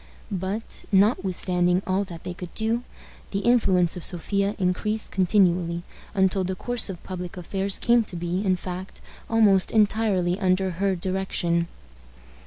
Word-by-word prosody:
But, 195 +4 -4
notwithstanding 185 -3 +2
all 190 +2 +1
that 170 -3 -10
they 180 - -5
could 175 -1 -8
do, 225 +2 0 0.5
the 195 - -2
influence 195 -8 +3
of 180 - -7
Sophia 200 +3 0
increased 210 +3 -1
continually, 175 -3 +2 0.3
until 190 0 +2
the 185 +1 -2
course 245 +3 +1
of 180 -3 -7
public 180 -1 -6
affairs 195 +2 -1
came 235 -1 +3
to 190 - -9
be, 175 +3 -2
in 190 -2 +2
fact, 185 +1 -7 0.3
almost 210 -4 +4
entirely 205 -4 +2
under 190 -1 +1
her 190 +2 0
direction. 175 -2 -1
190 Hz, 140 wpm, -25 LUFS, 180-200 Hz, 0.5 s, almost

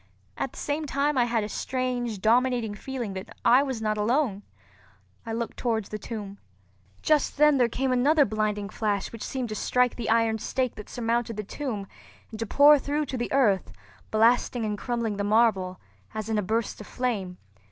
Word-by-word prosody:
At - - -3
the - - -13
same 300 +1 -2
time 285 +2 0
I 245 -2 +3
had 230 -2 0
a - - -3
strange, 245 -3 -2
dominating 240 0 +2
feeling 240 -1 -5
that 190 0 -7 0.2
I 245 +3 +7
was 260 -5 -3
not 215 -1 0
alone. 230 -2 +1 0.9
I - - -3
looked 230 +1 -3
towards 220 -4 -1
the 215 - -5
tomb. 205 -2 -7 0.6
Just 305 -2 +2
then 300 -1 +5
there 240 -2 +4
came 265 +3 -1
another 285 +4 +4
blinding 210 -1 -1
flash 205 -2 -2
which 230 - -7
seemed 255 -3 -3
to 215 - -4
strike 250 +3 +1
the 235 -3 -3
iron 225 -1 +2
stake 255 +2 -1
that 210 - -10
surmounted 230 -1 -1
the 210 - -3
tomb 215 -2 -4 0.5
and 220 - -8
to 225 - -2
pour 290 +5 +7
through 295 +3 -1
to 265 -1 -4
the 240 - -3
earth, 215 -9 +2 0.4
blasting 230 +1 +3
and 210 -1 -1
crumbling 230 -1 -2
the 200 - -1
marble, 205 -4 +2 0.4
as 215 0 -4
in 220 -1 +1
a - - +1
burst 220 +2 -2
of 210 - -10
flame. 205 -8 -2
230 Hz, 190 wpm, -26 LUFS, 210-255 Hz, 0.9 s, I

